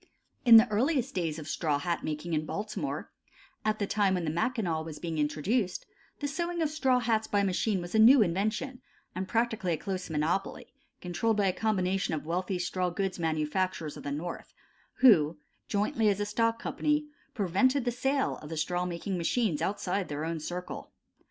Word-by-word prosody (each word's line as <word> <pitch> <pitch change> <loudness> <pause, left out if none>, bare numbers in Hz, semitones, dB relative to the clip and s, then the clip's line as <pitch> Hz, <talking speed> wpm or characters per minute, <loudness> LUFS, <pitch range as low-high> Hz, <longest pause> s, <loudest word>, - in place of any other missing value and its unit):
In 230 -2 +10
the 225 +2 +7
earliest 260 +4 +1
days 165 -4 -1
of 155 - -7
straw 150 -4 0
hat 170 +4 -2
making 155 +2 -3
in 155 0 +1
Baltimore, 210 +1 -4 0.5
at 215 0 +1
the 205 - -1
time 200 -2 +2
when 175 -2 -2
the 155 - 0
Mackinaw 175 -2 0
was 160 -1 -7
being 165 -2 -4
introduced, 180 - 0 0.4
the 290 - 0
sewing 340 +4 -2
of 305 - 0
straw 265 -5 +2
hats 225 -3 +1
by 205 -1 +1
machine 195 +1 +1
was 175 0 -7
a 220 - +3
new 235 +2 +8
invention, 215 +8 -2 0.3
and 185 +1 -4
practically 225 -6 0
a - - -1
close 185 +3 -4
monopoly 160 +5 -2 0.3
controlled 210 +5 0
by 205 - +2
a 190 - +3
strong - - -13
combination 185 -2 0
of 155 - -5
wealthy 180 +3 -1
straw 180 +1 -1
goods 190 +1 -2
manufacturers 160 +1 -1
of - - -9
the 140 - -4
North, 165 +5 -5 0.5
who, 170 - +6 0.3
jointly 210 +1 +1
as 200 0 0
a 205 - 0
stock 230 +2 +1
company, 300 0 0 0.3
prevented 250 +7 +2
the 245 - +1
sale 270 +3 0
of 150 - -10
the 160 - -5
straw 175 +3 0
sewing 175 +2 -3
machines 170 -3 0
outside 195 +1 -1
their 150 +1 -3
own 165 0 -2
circle. 180 +3 -6
190 Hz, 185 wpm, -29 LUFS, 165-225 Hz, 0.5 s, In